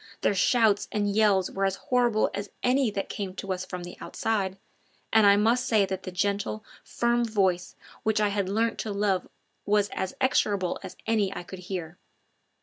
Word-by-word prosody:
Their -, -, +2 dB
shouts 210 Hz, +1 st, +3 dB
and 205 Hz, -1 st, 0 dB
yells 205 Hz, -4 st, +3 dB
were 195 Hz, -, -2 dB
as 195 Hz, -1 st, +1 dB
horrible 240 Hz, -3 st, +1 dB
as 200 Hz, 0 st, -4 dB
any 255 Hz, 0 st, +3 dB
that 200 Hz, -1 st, -3 dB
came 190 Hz, -2 st, -5 dB
to 195 Hz, -1 st, -3 dB
us 185 Hz, 0 st, -4 dB
from 180 Hz, -1 st, -6 dB
the 175 Hz, -, -9 dB
outside, 195 Hz, -4 st, -2 dB, 0.6 s
and 220 Hz, -2 st, +6 dB
I 200 Hz, -, +7 dB
must 235 Hz, +5 st, +2 dB
say 215 Hz, -3 st, +4 dB
that 190 Hz, -1 st, -4 dB
the 185 Hz, -, -6 dB
gentle, 200 Hz, +3 st, -1 dB, 0.2 s
firm 240 Hz, 0 st, +1 dB
voice 190 Hz, -5 st, 0 dB, 0.3 s
which 220 Hz, -1 st, +1 dB
I 210 Hz, -1 st, +3 dB
had 200 Hz, -2 st, -1 dB
learnt 225 Hz, +3 st, 0 dB
to 215 Hz, -, -3 dB
love 200 Hz, -2 st, 0 dB, 0.4 s
was 205 Hz, 0 st, +2 dB
as 190 Hz, -, -4 dB
execrable 205 Hz, -8 st, +1 dB
as 185 Hz, -2 st, -9 dB
any 215 Hz, -4 st, +1 dB
I 175 Hz, -, -5 dB
could 185 Hz, +1 st, -9 dB
hear. 180 Hz, -2 st, -6 dB
200 Hz, 185 wpm, -27 LUFS, 190-220 Hz, 0.6 s, I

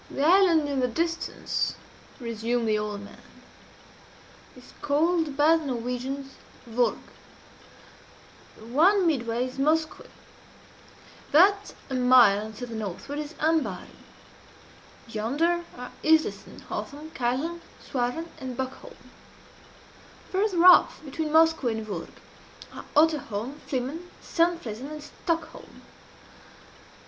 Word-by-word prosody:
"The 275 Hz, -, -2 dB
island 340 Hz, -3 st, +5 dB
in 280 Hz, -2 st, -1 dB
the 250 Hz, -, +2 dB
distance," 335 Hz, +7 st, -2 dB, 0.4 s
resumed 230 Hz, 0 st, -2 dB
the 215 Hz, -1 st, +2 dB
old 210 Hz, -1 st, -4 dB
man, 205 Hz, -, -13 dB, 1.4 s
"is 250 Hz, -, -15 dB
called 310 Hz, 0 st, +1 dB
by 310 Hz, +3 st, +5 dB
the 320 Hz, -, -6 dB
Norwegians 255 Hz, +2 st, -4 dB, 0.3 s
Vurrgh. 240 Hz, +1 st, +1 dB, 1.6 s
The 220 Hz, -, -13 dB
one 350 Hz, -, +4 dB
midway 240 Hz, -6 st, 0 dB
is 255 Hz, +1 st, -8 dB
Moskoe. 310 Hz, +3 st, 0 dB, 1.2 s
That 395 Hz, +6 st, +4 dB
a -, -, -6 dB
mile 245 Hz, -5 st, +5 dB
to 245 Hz, +4 st, -6 dB
the 235 Hz, -, -9 dB
northward 220 Hz, +7 st, -5 dB
is 300 Hz, +1 st, -6 dB
Ambaaren. 300 Hz, -, -1 dB, 1.1 s
Yonder 290 Hz, +11 st, 0 dB
are 250 Hz, 0 st, -8 dB
Iflesen, 315 Hz, 0 st, +1 dB
Hoeyholm, 300 Hz, +3 st, -7 dB
Kieldholm, 275 Hz, +8 st, -2 dB, 0.2 s
Suarven, 250 Hz, +6 st, -3 dB
and 255 Hz, -2 st, -6 dB
Buckholm. 265 Hz, -, -6 dB, 1.3 s
Farther 375 Hz, -3 st, +2 dB
off 360 Hz, -3 st, +6 dB
between 305 Hz, +2 st, -3 dB
Moskoe 320 Hz, -4 st, +4 dB
and 220 Hz, 0 st, -5 dB
Vurrgh 195 Hz, -6 st, -7 dB, 0.6 s
are -, -, -9 dB
Otterholm, 285 Hz, -5 st, +1 dB
Flimen, 285 Hz, +7 st, -4 dB
Sandflesen, 330 Hz, -9 st, -1 dB
and 305 Hz, -1 st, -8 dB
Skarholm. 330 Hz, 0 st, -5 dB
280 Hz, 105 wpm, -26 LUFS, 240-325 Hz, 1.6 s, off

